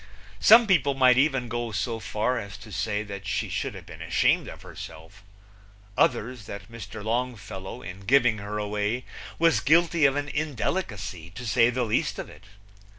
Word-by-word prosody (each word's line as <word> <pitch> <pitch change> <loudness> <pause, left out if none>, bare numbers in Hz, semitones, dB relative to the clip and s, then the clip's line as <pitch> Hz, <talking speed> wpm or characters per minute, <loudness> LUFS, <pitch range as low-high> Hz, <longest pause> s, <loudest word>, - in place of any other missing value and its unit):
Some 230 +2 +8
people 145 - +3
might 130 -1 +5
even 135 -4 +2
go 120 0 -3
so 110 +3 -2
far 110 +5 -1
as 100 -3 -8
to 105 +2 -13
say 105 +1 -1
that 100 -2 -8
she - - -1
should - - -3
have - - -10
been - - -11
ashamed - - +2
of - - -10
herself; 80 +4 -11 0.7
others, 120 -4 +1
that 100 +3 -8
Mr. 110 -2 -8
Longfellow, 110 -5 -4
in 90 +2 -8
giving 120 +1 +3
her 105 +1 -5
away, 105 +3 -2 0.3
was 165 0 +4
guilty 165 +1 +4
of 135 0 +4
an 145 0 -2
indelicacy, 115 - -3
to 125 - -7
say 115 +2 +4
the 125 +1 -1
least 110 - 0
of - - -6
it. 110 - -16
115 Hz, 170 wpm, -26 LUFS, 100-135 Hz, 0.7 s, Some